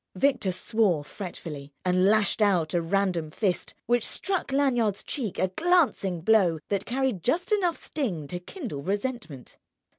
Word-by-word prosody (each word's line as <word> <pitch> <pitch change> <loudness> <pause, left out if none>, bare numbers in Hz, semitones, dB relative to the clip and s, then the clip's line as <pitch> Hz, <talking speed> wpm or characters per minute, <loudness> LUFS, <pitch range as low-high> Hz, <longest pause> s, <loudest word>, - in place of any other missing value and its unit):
Victor 200 -3 +2
swore 185 -4 +1
fretfully 150 -4 -8
and 185 0 +3
lashed 215 +1 +3
out 180 -7 +3
a 175 - +2
random 175 -2 0
fist, 185 +3 -2
which 240 -1 +2
struck 380 -7 -2
Lanyard's 245 -7 +1
cheek 230 -9 -4
a 185 - +1
glancing 270 - +2
blow 185 -4 +4
that 200 -1 -1
carried 255 -6 0
just 335 - 0
enough 365 -5 +2
sting 200 - -3
to 175 +5 -5
kindle 205 - -6
resentment. 200 - -4
200 Hz, 145 wpm, -27 LUFS, 175-255 Hz, -, blow